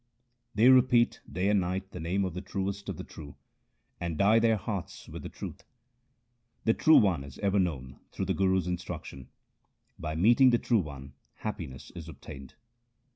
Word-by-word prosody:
They 110 +4 +5
repeat 125 -2 +4
day 90 +3 0
and 105 -1 +4
night 95 +2 -3
the 90 - -7
name 90 +5 0
of 90 - -4
the 90 - -5
Truest 100 +1 -4
of 95 - -4
the - - -6
true, 70 -3 -11 0.6
and 85 -3 -3
dye 105 +5 +5
their 115 -1 +3
hearts 100 -3 -5
with - - -8
the - - -7
truth. - - -8 1.0
The 110 - +4
True 155 +6 +6
One 90 -9 +3
is 70 -1 -11
ever 100 -1 +1
known 70 -8 -2
through 95 - -3
the 95 - 0
Guru's 95 -2 +2
instruc 90 -1 -4
tion; 65 -2 -10 0.7
by 80 0 -4
meeting 120 +9 +6
the 120 - +4
True 115 -1 +2
One 70 -5 -7 0.2
happiness 75 -11 -6
is 85 -2 -8
obtained. 70 -2 -11
95 Hz, 180 wpm, -29 LUFS, 80-105 Hz, 1.0 s, True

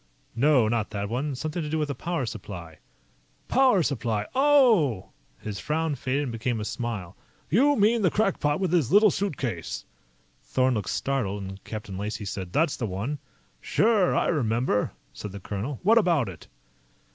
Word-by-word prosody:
"No, 130 -2 +4
not 110 -1 0
that 100 -1 -4
one. 135 +4 -2
Something 155 +6 -3
to 150 - -4
do 160 - -1
with 150 -2 -1
a - - -1
power 165 +1 -2
supply." 90 -7 -8 0.7
"Power 255 -9 +4
supply. 115 -8 -1
Oh!" 245 - +4 0.3
His 105 -3 -6
frown 155 - -1
faded 135 +2 -1
and 130 - -3
became 115 +1 -2
a 105 - -3
smile. 105 -7 -4 0.4
"You 280 - +4
mean 225 +1 +3
the 185 - +4
crackpot 170 -7 +1
with 185 -3 -1
his 160 -9 +2
little 210 0 +6
suitcase." 130 - -3 0.6
Thorn 130 - +1
looked 105 -4 -2
startled, 105 -8 -1
and 95 +1 -8
Captain 105 -3 -6
Lacey 105 +1 -4
said: 95 -2 -5
"That's 150 - +1
the 115 - -2
one." 105 +10 -3 0.4
"Sure 215 -5 +2
I - - +2
remember," 120 -7 +1 0.2
said 100 - -7
the 100 - -6
colonel. 105 +8 -4
"What 225 +5 +6
about 170 - +2
it?" 85 -4 -11
130 Hz, 170 wpm, -26 LUFS, 105-170 Hz, 0.7 s, little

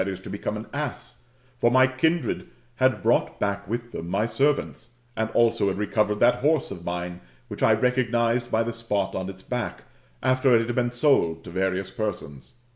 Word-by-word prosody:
to 95 -1 -6
become - - -3
an - - -7
ass]; - - -5 0.4
for 120 - +4
my 130 +2 +6
kindred 160 +6 0 0.3
had 130 -7 +2
brought - - +1
back 100 0 -2
with 120 +3 -4
them 85 - -6
my 100 +4 +1
servants, 135 -1 -1 0.2
and 110 0 -1
also 115 -3 +3
had 95 - -1
recovered 105 0 0
that 125 +1 +4
horse 150 +2 +1
of 85 - -7
mine, 90 0 -4 0.3
which - - -7
I - - +5
recognised 120 -1 +1
by 110 +1 +2
the 115 +1 -3
spot 105 -4 -1
on 95 0 -3
its 95 0 -10
back, 125 -1 -4 0.4
after 130 -1 +4
it 115 0 +3
had 120 - -2
been 120 -1 +1
^Id 120 - +2
to 85 - -9
various 95 +1 -1
persons. 105 - -5
115 Hz, 185 wpm, -25 LUFS, 95-125 Hz, 0.4 s, my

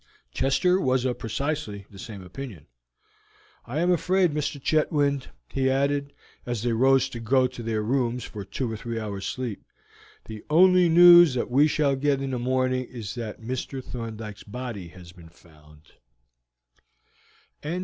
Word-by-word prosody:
Chester 180 +8 +2
was 130 -1 +1
of 125 -1 -2
precisely 115 -4 -3
the 100 - -13
same 105 -3 -8
opinion. 95 - -9 1.0
"I 145 +7 -2
am 175 +1 +2
afraid, 180 -1 +2
Mr. 150 -1 -2
Chetwynd," 145 -2 +1 0.3
he 130 -1 +1
added, 140 +1 0 0.3
as 120 -3 -4
they 120 -1 +1
rose 135 +3 +4
to 120 - -7
go 130 +3 +2
to 125 -1 -5
their 110 -2 -2
rooms 125 +1 0
for 105 -2 -7
two 120 +3 -4
or - - -4
three 115 +1 -5
hours' 100 -3 -5
sleep, 125 -6 -5 0.6
"the 110 -1 -9
only 180 +2 +5
news 175 -3 +8
that 125 - -2
we 140 +4 +5
shall 145 -2 +1
get 140 0 +1
in 135 -1 -3
the 125 - -2
morning 130 +1 0
is 115 -4 -7
that 115 -2 -6
Mr. 130 +3 -5
Thorndyke's 110 -4 -7
body 110 -4 -7
has 90 0 -13
been 85 -2 -15
found." 75 -2 -20
130 Hz, 155 wpm, -25 LUFS, 110-140 Hz, 1.0 s, news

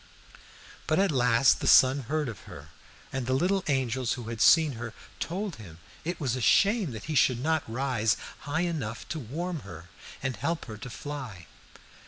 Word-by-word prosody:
"But 155 - +2
at 195 -2 +3
last 125 -1 +4
the - - -3
sun 130 +2 +7
heard 155 0 -1
of 110 -8 -8
her, - - -11 0.4
and 130 -2 -3
the 130 - +2
little 185 +6 +1
angels 130 -3 0
who 120 -3 -6
had 115 -1 -4
seen 160 -3 +6
her 115 -2 -7 0.2
told 185 0 -3
him 90 -7 -11 0.3
it 175 +2 -3
was 130 -6 -1
a 130 - -4
shame 200 - +4
that 110 - -7
he 155 - -4
should 130 -4 +3
not 160 +3 +1
rise 120 -3 +1 0.3
high 155 +3 0
enough 150 -11 -3
to 160 - -3
warm 160 +7 -4
her 90 - -11 0.3
and 130 -2 -2
help 165 0 -2
her 110 -3 -8
to 125 - -7
fly. 125 - -7
130 Hz, 185 wpm, -28 LUFS, 115-160 Hz, 0.4 s, sun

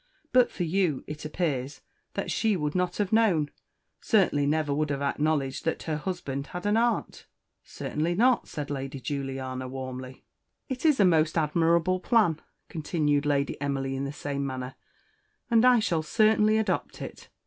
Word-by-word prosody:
"But 250 -1 +5
for 180 - -4
you, 170 -4 0
it 150 +1 -7
appears 145 -4 -2 0.3
that - - -2
she 220 -3 +1
would 150 -2 -2
not 180 -1 -1
have 205 0 -1
known 190 -10 +3 0.5
certainly 175 - +2
never 150 -1 +1
would 150 +1 0
have 140 -1 -2
acknowledged 140 -2 0
that 165 - -1
her 155 -2 -2
husband 150 -5 -4
had 180 +5 -7
an 205 +1 +2
aunt?" 235 +1 0 0.4
"Certainly 165 +3 -3
not," 245 +5 +3
said 145 -1 -5
Lady 135 -1 -4
Juliana, 130 -2 -4
warmly. 130 0 -7 0.4
"It 260 +3 -1
is 295 -6 +4
a 200 - +6
most 160 -2 +3
admirable 165 +3 +2
plan," 185 -8 +2 0.3
continued 150 -2 0
Lady 140 -1 0
Emily 135 -1 -1
in 135 +1 -2
the 140 - -4
same 140 -1 -4
manner, 130 -1 -4 0.8
"and 230 0 +5
I 250 -1 +7
shall 170 -7 +1
certainly 215 +4 +3
adopt 220 -1 -1
it. - - -9
155 Hz, 160 wpm, -27 LUFS, 140-185 Hz, 0.8 s, I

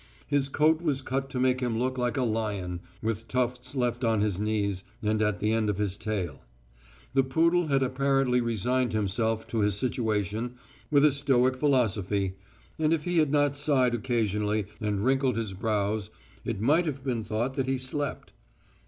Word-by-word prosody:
His 140 -1 +1
coat 155 +3 +3
was 145 -5 0
cut 135 +1 -2
to 130 -2 -3
make 130 0 +2
him 120 -3 -1
look 130 +2 0
like 125 +2 -1
a 130 - +2
lion, 105 -6 -2 0.2
with 115 0 -2
tufts 125 +1 -2
left 120 -1 0
on 110 -3 +2
his 105 -3 0
knees 100 -3 -1 0.2
and 110 0 +1
at 105 -3 +1
the 105 +4 0
end 110 -1 +1
of 105 - -1
his 100 -2 -1
tail. 105 -4 -3 0.7
The 135 - +5
poodle 165 +6 +2
had 135 -2 +2
apparently 130 -1 +2
resigned 120 +2 0
himself 110 +2 0
to 115 - -1
his 105 -2 +2
situation 110 -1 -1 0.3
with 145 -1 +5
a 150 - +6
stoic 130 -2 +2
philosophy, 105 -8 +1 0.5
and 155 0 +3
if 155 - -6
he 175 0 +1
had 155 -3 +2
not 145 -1 +2
sighed 135 -4 +3
occasionally 105 -3 0
and 105 -2 -1
wrinkled 130 0 +2
his 110 -4 -3
brows, 105 +1 -1 0.3
it - - -3
might 155 - +3
have 140 -3 -4
been 120 -5 -1
thought 115 +5 -2
that 135 -1 -1
he 135 0 +1
slept. 135 +2 -4
125 Hz, 180 wpm, -28 LUFS, 105-135 Hz, 0.7 s, a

